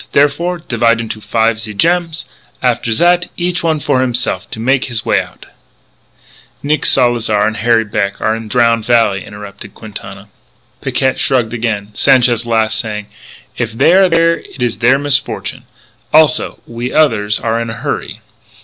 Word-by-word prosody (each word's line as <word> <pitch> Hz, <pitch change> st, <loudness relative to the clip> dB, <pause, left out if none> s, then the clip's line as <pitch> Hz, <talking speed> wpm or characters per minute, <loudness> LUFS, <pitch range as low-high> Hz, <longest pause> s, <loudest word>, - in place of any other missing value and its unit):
Therefore, 170 Hz, +5 st, +2 dB
divide 120 Hz, -7 st, +1 dB
into 110 Hz, -1 st, -5 dB
five 110 Hz, +1 st, 0 dB
ze 110 Hz, -2 st, -6 dB
gems. 165 Hz, -, 0 dB, 0.4 s
After 120 Hz, -2 st, 0 dB
zat, 175 Hz, +8 st, +2 dB
each 175 Hz, 0 st, -1 dB
one 160 Hz, -2 st, 0 dB
for 130 Hz, -2 st, +1 dB
himself 120 Hz, -6 st, -2 dB
to -, -, -7 dB
make 130 Hz, +3 st, +1 dB
his 120 Hz, -3 st, -3 dB
way -, -, +2 dB
out -, -, -13 dB, 0.6 s
" -, -, -29 dB
"Nick 150 Hz, 0 st, 0 dB
Salzar 115 Hz, -5 st, +2 dB
and 110 Hz, 0 st, -1 dB
Harry 115 Hz, +1 st, +2 dB
Beck 100 Hz, -2 st, -2 dB
are 110 Hz, -, 0 dB
in 115 Hz, -1 st, -7 dB
the -, -, -12 dB
Drowned 115 Hz, -1 st, +2 dB
Valley," 115 Hz, -4 st, +2 dB
interrupted 105 Hz, -1 st, -11 dB
Quintana. 100 Hz, -2 st, -9 dB, 0.5 s
Picquet 130 Hz, -1 st, 0 dB
shrugged 120 Hz, -4 st, +1 dB
again; 110 Hz, -3 st, -3 dB
Sanchez 120 Hz, -1 st, +3 dB
laughed, 110 Hz, -1 st, +1 dB
saying: 105 Hz, -2 st, -4 dB, 0.5 s
"If 115 Hz, -1 st, -2 dB
they 115 Hz, -, +4 dB
are 190 Hz, 0 st, +5 dB
there 165 Hz, 0 st, +3 dB
it 130 Hz, -, -7 dB
is 115 Hz, -5 st, -2 dB
their 125 Hz, +3 st, +4 dB
misfortune. 140 Hz, 0 st, -2 dB, 0.5 s
Also, 155 Hz, -4 st, +3 dB
we 120 Hz, +2 st, -5 dB
others 110 Hz, -9 st, +2 dB
are 115 Hz, 0 st, -1 dB
in 115 Hz, -, -4 dB
a -, -, -4 dB
hurry." -, -, -4 dB
115 Hz, 165 wpm, -14 LUFS, 110-140 Hz, 0.6 s, are